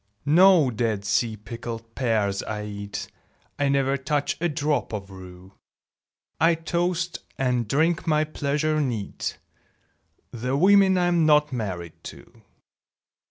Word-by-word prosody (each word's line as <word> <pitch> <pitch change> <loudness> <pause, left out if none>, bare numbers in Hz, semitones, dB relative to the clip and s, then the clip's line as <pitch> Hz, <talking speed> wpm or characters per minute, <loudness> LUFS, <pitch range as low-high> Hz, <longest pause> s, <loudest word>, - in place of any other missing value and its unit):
No 165 -2 +5
Dead 110 -3 -2
Sea 110 +2 0
pickled 115 +1 -8
pears 110 -6 0
I 105 -1 -5
eat; 100 -1 -6 0.5
I 145 -1 +2
never 140 0 +1
touch 145 +2 -1
a 175 - +1
drop 145 -5 -1
of 100 -2 -5
rue; 95 0 -12 0.9
I 165 +1 +4
toast, 170 +1 -2 0.2
and 125 -3 0
drink 165 +8 +1
my 155 -1 +3
pleasure 155 0 -1
neat, 115 -8 -3 0.9
The 125 +3 -2
women 190 +2 +5
I'm 175 -3 +2
not 150 -2 +4
married 90 -8 -5
to! - - -12
135 Hz, 120 wpm, -24 LUFS, 110-155 Hz, 0.9 s, No